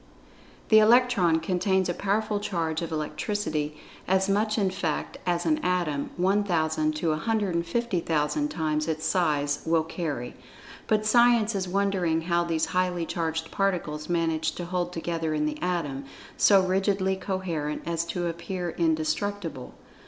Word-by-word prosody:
The 220 - +8
Electron 215 -7 +4
contains 185 +2 +1
a 175 - 0
powerful 205 +3 0
charge 165 -6 -2
of 165 - -4
Electricity, 155 -1 -2 0.3
as 190 +1 +2
much 215 +2 +1
in 195 -3 +1
fact 165 -5 -3
as 175 -1 0
an 310 -1 +2
Atom, 175 - -1
1,000 170 -5 +1
to 160 +2 -1
150,000 175 - 0
times 155 - -1
its 160 0 -2
size 150 -4 +1
will 165 0 +2
carry. 155 -7 -4 0.5
But 215 -1 +2
Science 235 -1 +4
is 190 -2 -2
wondering 185 -4 +1
how 170 +1 +1
these 165 -2 0
highly 180 -2 +1
charged 160 -1 -3
particles 170 -6 -1
manage 165 -2 0
to 175 - -5
hold 180 0 -2
together 165 -2 -2
in 150 0 0
the 150 0 -3
Atom, 150 -7 -2 0.3
so 195 -2 +5
rigidly 190 0 +1
coherent 180 -6 -3
as 170 0 -1
to 175 +1 -3
appear 175 +1 -3
indestructible. 160 -1 -2
175 Hz, 135 wpm, -27 LUFS, 160-195 Hz, 0.5 s, The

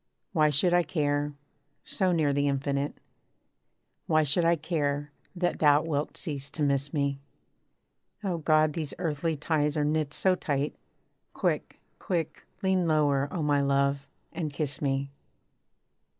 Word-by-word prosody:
Why 155 -3 +4
should 150 +5 +3
I 175 - +5
care, 145 -4 -1 0.5
so 190 -2 +1
near 155 -4 +2
the 145 +1 +1
Infinite 140 +1 -1 1.1
Why 155 -1 +4
should 150 +4 +2
I 170 +1 +5
care, 145 -3 -2 0.2
that 175 0 -1
thou 150 0 +5
wilt 150 -2 -2
cease 145 -3 -5
to 155 - -3
miss 140 0 +1
me? 140 -3 0 1.0
O 180 -4 -1
God! 155 -1 +3
these 155 -3 -4
earthly 160 0 -1
ties 150 0 0
are 150 - +2
knit 155 -1 0
so 185 +4 +2
tight 145 -5 -1 0.6
Quick, - - -1 0.2
quick, 170 -6 -3 0.2
lean 190 -2 +2
lower, 145 -3 +2
O 170 - -2
my 145 -1 +3
love, 140 0 +1 0.3
and 155 -4 -3
kiss 145 -1 -4
me! 140 -1 -1
150 Hz, 140 wpm, -28 LUFS, 140-160 Hz, 1.1 s, I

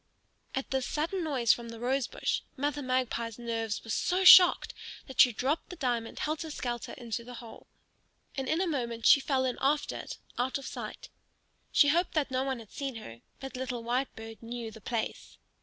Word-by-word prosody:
At 265 - -3
this 265 -1 0
sudden 335 +5 -1
noise 260 -7 +3
from 235 -1 -7
the 230 -1 -8
rose 255 +1 0
bush - - -1 0.2
Mother 290 +2 -1
Magpie's 255 -3 -1
nerves 225 -2 -3
were 225 - -6
so 365 - +1
shocked 365 -1 +9 0.3
that 265 - +3
she 250 - +7
dropped 275 +10 -1
the 360 - -7
diamond 240 -7 -2
helter 310 +1 -2
skelter 240 -5 -4
into 235 -1 -5
the 245 +1 -9
hole. 230 -1 -11 0.7
And 270 -2 -3
in 325 +3 +2
a - - +2
moment 235 -8 -3
she - - +8
fell 265 -1 0
in 255 - -2
after 290 +2 +1
it, - - -7 0.2
out 250 +1 0
of 275 - -9
sight. - - -7 0.6
She 290 - +5
hoped 345 +4 +2
that 290 -3 +1
no 260 0 +1
one 265 -1 -2
had 225 -3 -12
seen 275 -3 -4
her, 115 - -9 0.2
but 270 -1 -7
little 250 -2 -4
Whitebird 230 -2 -3
knew 230 -1 -6
the 220 - -13
place. 230 +1 -4
255 Hz, 190 wpm, -30 LUFS, 235-285 Hz, 0.7 s, shocked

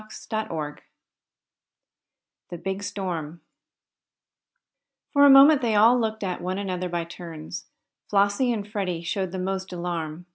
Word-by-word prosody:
CHAPTER 215 0 -5
XX 150 -2 -4 1.7
THE 175 - -6
BIG 190 +3 -4
STORM 175 -6 -4 1.7
For 285 -1 +6
a - - +8
moment 275 +2 +8
they 230 -3 +1
all 230 +4 +6
looked 220 -2 -2
at 185 -2 -3
one 185 +2 -3
another 185 -2 -3
by 170 -1 -2
turns. 165 -2 -8 0.4
Flossie 200 +5 +2
and 210 -3 -3
Freddie 190 -5 -3
showed 190 +1 -2
the 190 - -5
most 190 +1 -3
alarm. 170 -2 -4
190 Hz, 135 wpm, -25 LUFS, 175-215 Hz, 1.7 s, a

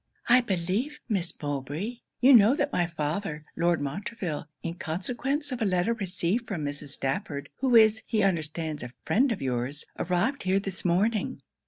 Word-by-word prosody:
'I 250 +1 +7
believe, 205 - -1
Miss 190 -7 0
Mowbray, 145 - -3 0.2
you 265 +2 +8
know 230 +2 +7
that 290 - -1
my 175 - +2
father, 155 0 -3
Lord 170 0 +2
Montreville, 155 +2 -4 0.2
in 165 - -2
consequence 250 - -2
of 250 -2 -4
a - - +3
letter 185 +3 +2
received 195 +1 -1
from 170 -8 -3
Mrs. 145 0 -5
Stafford, 140 +2 -2
who 255 -2 +2
is, 220 -1 +6
he 220 -3 +1
understands, 160 -4 -1
a 125 0 -7
friend 260 +4 +3
of 210 - -2
your's, 130 +3 -1
arrived 180 +11 0
here 190 +1 +2
this 195 -2 -5
morning.' 200 +5 +1
185 Hz, 165 wpm, -28 LUFS, 155-230 Hz, 0.2 s, you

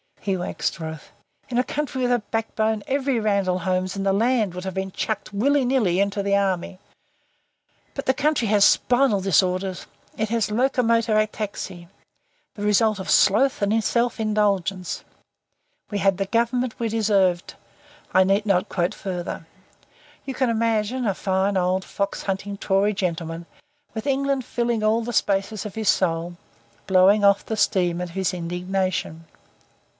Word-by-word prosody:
He 195 -2 -1
waxed 180 0 -3
wroth. 160 -1 -7 0.4
In 245 - -2
a 250 - +3
country 275 -2 -3
with 245 - +1
a 245 - +3
backbone 220 -1 -1
every 270 -2 0
Randall 200 -4 +1
Holmes 185 +1 -1
in 195 - -3
the 195 0 +2
land 220 -2 +1
would 180 0 -6
have 190 - -4
been 190 +1 -3
chucked 215 +2 -3
willy 270 +6 +2
nilly 225 -9 +2
into 200 0 0
the 200 0 +1
army. 190 -2 -1 1.2
But 275 - -4
the 260 - +3
country 295 -4 +1
had 205 0 +2
spinal 245 -4 +3
disorders. 185 0 +1 0.3
It 220 -1 -1
had 225 -2 0
locomotor 230 -2 +2
ataxy. 205 -5 -3 0.7
The 205 - -6
result 210 0 +2
of 190 - -6
sloth 220 +7 +4
and 215 +2 +2
self 235 +1 0
indulgence. 200 -4 0 0.9
We 205 - -2
had 195 -1 +2
the 195 - -1
Government 235 +2 0
we 230 - 0
deserved... 195 -5 +1 0.6
I 190 - +5
need 195 +3 +1
not 195 -1 +1
quote 175 -1 -1
further. 175 -3 -5 0.8
You 270 - -4
can 260 -1 0
imagine 230 +2 0
a 200 -3 0
fine 190 +1 0
old 185 +1 +1
fox 200 0 -3
hunting 200 +1 -3
Tory 200 +1 +1
gentleman, 170 -3 -3 0.5
with 220 +5 -4
England 275 -1 0
filling 235 -3 -1
all 220 +2 +2
the 240 +1 -5
spaces 200 0 0
of 210 - -7
his 220 -2 0
soul, 170 -1 0 0.5
blowing 195 +2 +5
off 200 0 +4
the 220 - -3
steam 180 -4 +1
of 180 -1 -5
his 190 0 -1
indignation. 180 -1 -3
200 Hz, 155 wpm, -23 LUFS, 185-230 Hz, 1.2 s, I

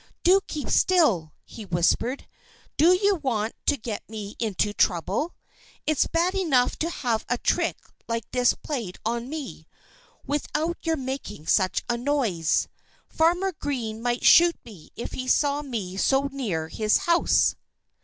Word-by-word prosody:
"Do 380 +3 +5
keep 300 - -5
still!" 235 - +3
he 225 - -10
whispered. 200 +8 0 0.5
"Do 340 +4 +5
you 400 +2 +3
want 230 -7 -1
to 285 - +3
get 220 -3 -6
me 210 -2 -7
into 210 -2 0
trouble? 200 - 0 0.5
It's 310 -2 +2
bad 345 +3 +1
enough 310 -11 +2
to 330 - 0
have 240 -9 -1
a 245 - +1
trick - - 0 0.3
like 230 -1 -2
this 250 -1 +3
played 235 - -5
on 235 +2 -2
me, 305 -3 -7 0.6
without 300 +4 -2
your 325 -1 0
making 260 - -6
such 185 +1 +2
a 240 -1 -1
noise. 240 - +1 0.4
Farmer 350 +4 +2
Green 245 -9 -4
might 240 0 -1
shoot 340 0 +7
me 205 -9 -13
if 235 - -6
he 255 - -5
saw 285 +2 +2
me 215 -10 -5
so 270 +6 +2
near 200 -13 -3
his 215 +4 +2
house. 340 0 +3
250 Hz, 145 wpm, -25 LUFS, 215-310 Hz, 0.6 s, shoot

